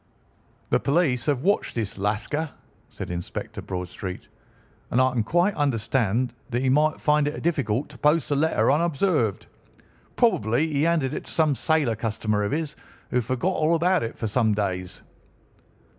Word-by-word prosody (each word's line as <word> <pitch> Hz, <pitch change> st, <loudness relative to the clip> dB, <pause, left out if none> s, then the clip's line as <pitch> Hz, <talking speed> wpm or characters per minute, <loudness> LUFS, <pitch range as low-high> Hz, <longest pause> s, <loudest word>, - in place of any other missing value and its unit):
"The -, -, +4 dB
police 140 Hz, -5 st, +1 dB
have 140 Hz, -3 st, +1 dB
watched 200 Hz, +3 st, +1 dB
this 115 Hz, -2 st, -2 dB
Lascar," 110 Hz, +10 st, -1 dB, 0.4 s
said -, -, -7 dB
Inspector 85 Hz, 0 st, -5 dB
Bradstreet, 90 Hz, 0 st, -6 dB, 0.6 s
"and 125 Hz, -, +1 dB
I 130 Hz, 0 st, +4 dB
can 120 Hz, -, +1 dB
quite 175 Hz, -, +2 dB
understand 125 Hz, -, 0 dB, 0.2 s
that 120 Hz, +1 st, -1 dB
he 130 Hz, -, +2 dB
might 150 Hz, +3 st, +3 dB
find 150 Hz, -1 st, +2 dB
it 150 Hz, -, -4 dB
difficult 140 Hz, -6 st, 0 dB
to 135 Hz, -4 st, -14 dB
post 150 Hz, 0 st, +2 dB
a -, -, +3 dB
letter 155 Hz, -1 st, +2 dB
unobserved. 150 Hz, -, +1 dB, 0.7 s
Probably 125 Hz, -, +2 dB
he 140 Hz, -, +1 dB
handed 160 Hz, -5 st, +1 dB
it -, -, -5 dB
to -, -, -6 dB
some 155 Hz, -3 st, +2 dB
sailor 145 Hz, -4 st, +1 dB
customer 110 Hz, -1 st, -1 dB
of 100 Hz, -, -1 dB
his, 150 Hz, 0 st, -2 dB, 0.4 s
who 125 Hz, -, +2 dB
forgot 130 Hz, -, -1 dB
all 160 Hz, 0 st, +2 dB
about 180 Hz, +2 st, +2 dB
it 115 Hz, -, -4 dB
for -, -, -3 dB
some 110 Hz, -1 st, +2 dB
days." 90 Hz, -3 st, -3 dB
130 Hz, 160 wpm, -25 LUFS, 110-155 Hz, 0.7 s, The